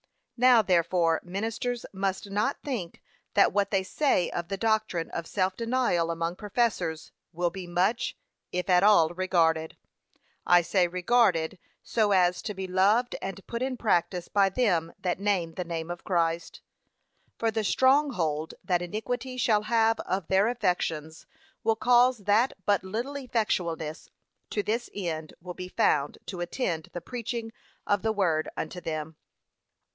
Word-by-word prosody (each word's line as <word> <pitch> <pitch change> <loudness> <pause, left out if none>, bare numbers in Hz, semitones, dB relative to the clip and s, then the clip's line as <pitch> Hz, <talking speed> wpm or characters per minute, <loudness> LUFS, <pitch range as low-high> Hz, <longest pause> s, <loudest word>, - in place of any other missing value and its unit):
Now 245 -2 +6
therefore 170 -2 +2
ministers 225 +6 -3
must 195 +1 -2
not 210 +8 0
think 225 - -5 0.3
that - - +5
what 200 -1 +1
they 195 -2 +1
say 190 - +1
of 170 -1 -3
the 195 - -3
doctrine 220 -6 0
of 165 -1 -4
self 185 -1 0
denial 230 -8 0
among 165 +1 -2
professors, 210 -7 -1 0.2
will 175 0 -1
be 185 0 -7
much, 185 +7 0 0.3
if 180 0 -2
at 180 -2 +5
all 200 -6 +6
regarded. 165 -3 +1 0.7
I 175 -1 +5
say, 180 +1 +2
regarded, 180 -2 +2 0.2
so 215 -3 +1
as 180 -1 +3
to 210 - -5
be 190 0 -4
loved 200 +7 +2
and 195 0 -6
put 235 0 -5
in 260 -1 -2
practice 180 -5 0
by 200 -1 +3
them 180 -7 +1
that 180 -1 -2
name 195 -5 0
the 180 - -3
name 165 -1 -4
of 175 - -7
Christ. 170 -3 -1 0.8
For 225 -1 0
the 220 0 -1
strong 270 +6 +3
hold 155 -4 -2
that 180 -2 +1
iniquity 245 +7 -4
shall 220 -4 +3
have 225 0 +2
of 185 -1 -2
their 195 +2 +3
affections 170 -8 -2 0.4
will 225 0 +2
cause 245 +2 +4
that 215 +6 +3
but 205 -2 +2
little 230 +9 -4
effectualness 180 - -2 0.4
to 205 - -1
this 230 +3 -2
end 160 -5 -4
will 180 +1 -8
be 180 +1 -7
found 145 -5 +1
to 180 -3 -6
attend 175 -3 -2
the 175 - -5
preaching 235 -1 -5 0.3
of 205 -1 +1
the 220 - +1
Word 170 -7 +1
unto 175 +3 -4
them. 155 -1 -4
190 Hz, 155 wpm, -27 LUFS, 170-225 Hz, 0.8 s, Now